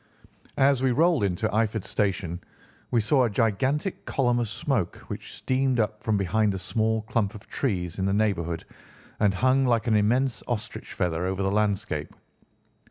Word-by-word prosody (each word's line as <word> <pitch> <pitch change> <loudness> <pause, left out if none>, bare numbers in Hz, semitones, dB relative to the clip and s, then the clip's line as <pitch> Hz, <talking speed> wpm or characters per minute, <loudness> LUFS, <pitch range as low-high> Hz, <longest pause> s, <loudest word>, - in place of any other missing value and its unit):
As 135 -1 +4
we 130 - +3
rolled 160 -2 +3
into 100 +2 0
Eyford 110 -1 0
Station 90 -4 -1 0.5
we 120 - +2
saw 130 +5 +3
a - - 0
gigantic 130 - 0
column 120 -3 +1
of 120 - 0
smoke 110 - -1
which - - -6
streamed 130 -1 0
up 105 -1 -1
from 110 -2 +1
behind 100 +2 +1
a - - -2
small 110 +3 0
clump 110 -1 -1
of 105 - -11
trees 90 - -2
in 95 - 0
the 100 - +1
neighbourhood 95 -6 0 0.5
and 105 -2 +4
hung 130 +5 +3
like 120 -3 +2
an 115 -3 +2
immense 120 +5 +2
ostrich 120 -4 -4
feather 90 0 -1
over 95 +1 -1
the 95 - +1
landscape. 100 -7 -1
110 Hz, 165 wpm, -26 LUFS, 95-125 Hz, 0.5 s, As